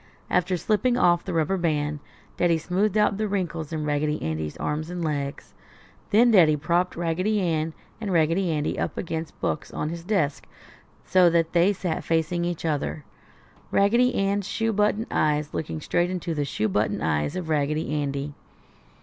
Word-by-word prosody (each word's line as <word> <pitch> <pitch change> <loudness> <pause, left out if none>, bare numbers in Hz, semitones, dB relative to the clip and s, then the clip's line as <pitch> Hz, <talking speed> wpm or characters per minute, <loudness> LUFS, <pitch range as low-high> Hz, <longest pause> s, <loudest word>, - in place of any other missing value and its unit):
After 180 +1 +2
slipping 240 +7 +1
off 175 -7 +3
the 190 - -5
rubber 165 +4 +1
band, 150 -3 -1 0.4
Daddy 170 -2 +2
smoothed 185 +6 0
out 210 -2 +3
the 215 0 -1
wrinkles 170 -6 -3
in 155 -2 -2
Raggedy 150 +1 0
Andy's 80 -1 -3
arms 155 +2 -3
and 175 -1 -3
legs. 145 -2 -3 0.6
Then 235 +3 +5
Daddy 165 -8 +6
propped 170 +5 0
Raggedy 180 +6 0
Ann 160 -3 -1 0.3
and 205 -3 -2
Raggedy 170 +2 +2
Andy 150 -2 -1
up - - -2
against 160 -2 -4
books 150 - -2
on 155 - -3
his 170 0 -6
desk, 175 -7 -1 0.6
so 180 -2 +5
that 165 -1 +1
they 175 +3 +4
sat 180 -4 -3
facing 165 +1 0
each 175 -1 -3
other; 150 -1 -2 0.6
Raggedy 235 +6 +3
Ann's 200 0 0
shoe 225 +1 -1
button 210 +2 +1
eyes 150 -1 +1
looking 160 0 -3
straight 175 +3 0
into 180 -2 -3
the 145 -2 -1
shoe 110 -5 -1
button 105 +2 0
eyes 75 - 0
of 180 -3 -4
Raggedy 150 0 0
Andy. 140 -1 -2
165 Hz, 165 wpm, -25 LUFS, 150-185 Hz, 0.6 s, Daddy